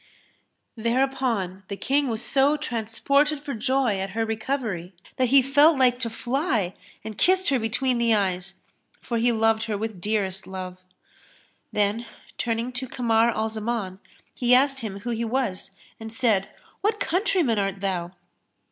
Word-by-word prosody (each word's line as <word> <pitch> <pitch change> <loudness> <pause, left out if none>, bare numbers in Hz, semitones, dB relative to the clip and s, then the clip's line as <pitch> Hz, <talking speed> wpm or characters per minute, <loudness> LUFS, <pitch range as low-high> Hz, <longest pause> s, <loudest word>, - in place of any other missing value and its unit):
'" - - -49
Thereupon 235 -7 0
the 200 - -5
King 280 +4 +1
was 225 -1 -3
so 280 +2 +3
transported 280 +3 0
for 285 -1 -5
joy 245 -2 +1
at 195 +1 -3
her 225 - +2
recovery 220 -6 -3 0.2
that 255 - +2
he 270 +2 +6
felt 290 +3 +5
like 250 -2 +3
to 235 -2 -1
fly 240 - -1 0.3
and 215 -1 -7
kissed 375 0 +3
her 270 -2 +2
between 240 +3 0
the 230 -1 +3
eyes, 190 -2 -2 0.4
for 235 -2 -2
he 240 +1 +3
loved 225 0 +2
her 215 -2 -2
with 215 -3 -5
dearest 195 -2 -1
love; 185 -1 -6 0.9
then, 210 +3 0 0.3
turning 230 +1 -1
to 255 +1 -5
Kamar 230 -2 +2
al 220 -1 -1
Zaman, 215 -4 -3 0.3
he 250 0 +4
asked 270 +1 +3
him 200 -5 -6
who 240 - -3
he 230 0 -1
was, 230 -6 -2 0.3
and 225 0 -7
said, 215 -4 +1 0.3
"What 425 +1 0
countryman 355 - +1
art 195 -1 -1
thou?" 180 -3 -2
230 Hz, 155 wpm, -25 LUFS, 205-265 Hz, 0.9 s, he